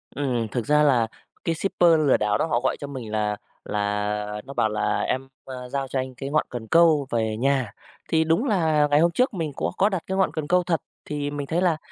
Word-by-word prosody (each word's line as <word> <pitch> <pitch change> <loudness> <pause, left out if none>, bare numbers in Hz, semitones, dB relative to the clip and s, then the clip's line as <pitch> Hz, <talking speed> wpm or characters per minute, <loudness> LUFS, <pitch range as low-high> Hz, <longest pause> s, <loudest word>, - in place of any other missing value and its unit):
Ừm, 125 -6 -1
thực 120 -3 -2
ra 150 +1 +4
là 125 -6 +3 0.4
cái 165 - 0
shipper 175 -1 +2 0.2
lừa - - +5
đảo 105 -1 +1
đó - - +1
họ 120 -7 +1
gọi 130 - +1
cho 145 - -6
mình 125 -6 -7
là 105 -1 -1 0.3
là 105 0 -2
nó 140 - -8
bảo 110 - +1
là 105 - 0
"Em, 130 +1 -2 0.2
ơ, 125 -1 -8
giao 135 0 -2
cho 130 0 -2
anh 130 -1 -5
cái 135 +2 -5
ngọn 155 +1 +1
cần 115 -2 -6
câu 160 -3 +4
về 110 -2 0
nhà". 130 -5 +1 0.4
Thì 160 0 +3
đúng 165 - +1
là 160 - +2
ngày 145 - +5
hôm 170 +1 +4
trước 250 +5 +1
mình 160 -5 -3
có - - -2
có 200 +2 +4
đặt 190 -4 -3
cái 190 0 -2
ngọn 190 - +2
cần 155 -2 -4
câu 180 0 +3
thật, 170 -3 0 0.2
thì 145 -1 -3
mình 145 -1 -4
thấy 170 +2 0
là 170 -4 +2
140 Hz, 240 wpm, -24 LUFS, 115-160 Hz, 0.4 s, lừa